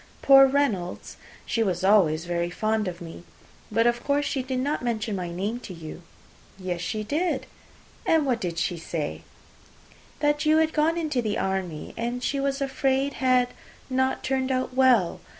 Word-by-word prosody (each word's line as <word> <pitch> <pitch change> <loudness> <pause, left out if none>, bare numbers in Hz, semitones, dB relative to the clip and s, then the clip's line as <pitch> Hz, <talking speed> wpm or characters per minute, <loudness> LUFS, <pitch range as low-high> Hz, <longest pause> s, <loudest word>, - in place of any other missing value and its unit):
Poor 270 0 +8
Reynolds, 250 -11 -1 0.3
she 230 - -1
was 185 -4 0
always 175 -5 +4
very 175 0 -1
fond 215 +3 -1
of 175 0 -6
me. 165 0 -9 0.5
But 230 +2 +2
of 240 0 +1
course 290 0 +1
she 275 -1 -1
did 260 0 -3
not 285 +4 -1
mention 220 -3 -1
my 180 -2 -4
name 200 +7 -3
to 190 -7 -9
you." 165 +1 -9 0.6
"Yes, 180 -2 -4
she 215 +4 -3
did." 320 +10 -1 0.6
"And 320 -2 +3
what 250 -4 0
did 170 -2 -3
she 175 0 -1
say?" 165 -2 -4 1.0
"That 295 0 +1
you 310 0 +4
were 320 0 +5
gone 315 +1 +1
into 305 -6 0
the 215 -2 -1
army, 190 -5 -3
and 240 +2 -3
she 280 - 0
was 275 0 -1
afraid 270 0 0
had 255 -1 +3 0.4
not 260 +1 0
turned 265 0 0
out 255 0 -1
well. 250 -9 +3
240 Hz, 170 wpm, -25 LUFS, 185-275 Hz, 1.0 s, Poor